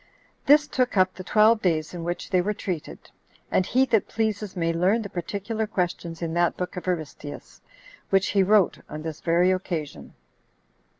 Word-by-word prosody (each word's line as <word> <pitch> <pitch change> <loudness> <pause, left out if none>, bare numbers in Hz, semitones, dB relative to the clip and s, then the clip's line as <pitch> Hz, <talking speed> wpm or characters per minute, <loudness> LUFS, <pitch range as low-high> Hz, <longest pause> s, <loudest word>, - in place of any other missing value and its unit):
This 295 +1 +6
took 250 -6 0
up 185 0 +4
the 185 - -9
twelve 215 +3 +4
days 160 -3 0
in 175 -2 -6
which 175 +3 -4
they 185 -2 +3
were 210 +3 -2
treated; 180 -7 -6 0.4
and 185 - +2
he 260 +2 +3
that 225 -5 +1
pleases 215 -3 -2
may 165 -2 0
learn 190 +7 +2
the 200 - -8
particular 205 +5 -3
questions 175 -3 -3
in 165 -1 -2
that 175 0 +1
book 180 - -4
of 180 - -7
Aristeus, 155 -4 -5 0.5
which 195 0 +2
he 200 - +3
wrote 200 0 +3
on 155 0 -7
this 160 -1 -6
very 175 +2 +3
occasion. 165 - -4
185 Hz, 175 wpm, -25 LUFS, 170-210 Hz, 0.5 s, This